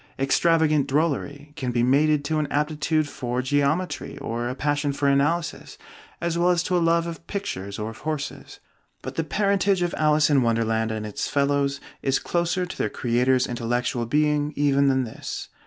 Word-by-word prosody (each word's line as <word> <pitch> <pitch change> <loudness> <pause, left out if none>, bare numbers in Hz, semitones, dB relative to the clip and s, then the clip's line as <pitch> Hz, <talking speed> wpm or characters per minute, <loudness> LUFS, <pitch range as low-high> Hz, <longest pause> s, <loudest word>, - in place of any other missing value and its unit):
Extravagant 155 +1 +2
drollery 145 0 -1
can 130 -5 -3
be 120 -1 +1
mated 145 +3 +3
to 155 +1 0
an 150 - -1
aptitude 150 +1 0
for 125 -2 -3
geometry 145 +6 0
or 120 +1 -3
a 125 - -4
passion 145 +1 0
for 140 0 0
analysis 145 +4 0 0.4
as 170 0 -1
well 175 +1 +3
as 175 -1 +2
to 180 - -1
a - - +4
love 165 0 +2
of 170 0 -7
pictures 100 - -4
or 110 +1 -4
of 110 - -13
horses. 150 -3 -5 0.4
But - - -5
the 165 - -1
parentage 195 +3 +1
of 175 - -1
'Alice 150 0 +3
in 140 -2 +4
Wonderland' 115 -1 +1
and 110 -1 -4
its 105 - -3
fellows 140 0 +1 0.2
is 135 0 +1
closer 175 +1 -1
to 175 - -8
their - - 0
creator's 125 +1 +1
intellectual 120 0 -2
being 150 +2 +1
even 140 -1 +3
than 130 -1 +2
this. 115 - -6
145 Hz, 175 wpm, -24 LUFS, 130-160 Hz, 0.4 s, a